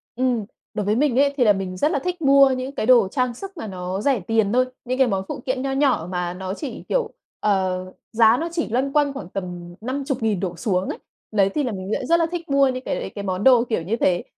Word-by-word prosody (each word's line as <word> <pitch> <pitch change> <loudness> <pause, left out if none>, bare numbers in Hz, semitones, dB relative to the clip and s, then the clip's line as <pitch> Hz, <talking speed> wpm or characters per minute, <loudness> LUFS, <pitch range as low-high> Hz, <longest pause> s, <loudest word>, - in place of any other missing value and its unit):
Ừm, 245 -3 0 0.3
đối 210 - -2
với 210 +1 +2
mình 265 0 +2
ấy 280 0 +3
thì 255 - +4
là 210 -3 +6
mình 190 -2 -4
rất 295 +11 +2
là - - +1
thích 360 +3 -4
mua 275 -1 +6
những 260 +1 -3
cái - - -1
đồ 235 -4 +6
trang 250 +3 -1
sức 390 +8 -9
mà 225 - -5
nó 185 0 -4
rẻ 265 0 +2
tiền 215 +2 +1
thôi, 255 +1 +4 0.2
những 255 +1 -2
cái 265 -1 +4
món 195 -4 -1
phụ - - -5
kiện 260 -1 -1
nho 270 0 -2
nhỏ 270 - +1
mà 180 -1 -2
nó 190 +1 -5
chỉ, 250 +1 -6
kiểu, 475 -3 0 0.3
ờ, 185 -3 0 0.3
giá 225 +1 +5
nó 330 +4 -2
chỉ 330 -6 -2
loanh 260 +4 0
quanh 290 -2 +2
khoảng 270 -10 -7
tầm 175 -2 -6
50.000 255 - -1
đổ 180 -2 -3
xuống 190 -4 -1
ấy. - - -4 0.3
Đấy, 200 -3 +3
thì 290 +9 -1
là 250 - -1
mình 190 0 -5
lại 260 - -2
rất 335 +5 +3
là 330 - +3
thích 345 -2 -5
mua 275 0 +4
những 255 0 -3
cái - - -2
đấy, - - -4
cái 200 - -5
món 190 0 -2
đồ 250 -2 +6
kiểu 230 -7 -2
như 190 +7 -1
thế, 180 -6 +1
240 Hz, 265 wpm, -22 LUFS, 195-275 Hz, 0.3 s, là